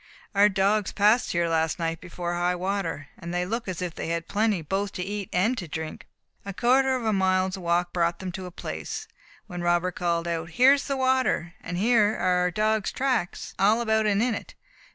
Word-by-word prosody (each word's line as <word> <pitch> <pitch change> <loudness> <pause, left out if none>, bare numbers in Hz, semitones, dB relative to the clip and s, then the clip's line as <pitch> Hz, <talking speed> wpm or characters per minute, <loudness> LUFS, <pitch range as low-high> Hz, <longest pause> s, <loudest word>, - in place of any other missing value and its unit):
"Our 205 +1 +5
dogs 200 +1 +1
passed 215 +4 +3
here 170 -1 +1
last 160 -1 +1
night 165 -1 -2
before 175 -1 -4
high 175 +1 +1
water, 180 -5 -3
and 170 -1 -6
they 180 0 -1
look 225 +4 -3
as 185 -1 -3
if 175 -2 -4
they - - -5
had 165 0 -1
had - - -38
plenty 210 -4 +1
both 195 +5 -2
to 180 - -3
eat 200 0 -4
and 210 +8 +2
to 175 - -6
drink." 160 0 -6 0.4
A 200 - -6
quarter 260 +3 +3
of 245 -3 -3
a 220 - +2
mile's 185 -1 +2
walk 175 -1 0
brought 170 -1 +1
them 185 -1 -5
to 185 0 -6
a - - -9
place, 440 - -6 0.4
when 180 -4 -6
Robert 175 +1 +1
called 170 -1 -1
out, 165 -1 -3
"Here 260 +3 +7
is 285 - -1
the 275 -1 -1
water! 260 -10 +1
and 175 +1 -5
here 215 +1 +3
are 180 0 +1
our 180 0 +2
dogs' 215 +2 0
tracks, 255 -9 -1
all 210 +4 +4
about 220 -2 +1
and 205 +1 +2
in 245 -1 +1
it. - - -7
190 Hz, 215 wpm, -26 LUFS, 175-215 Hz, 0.4 s, Here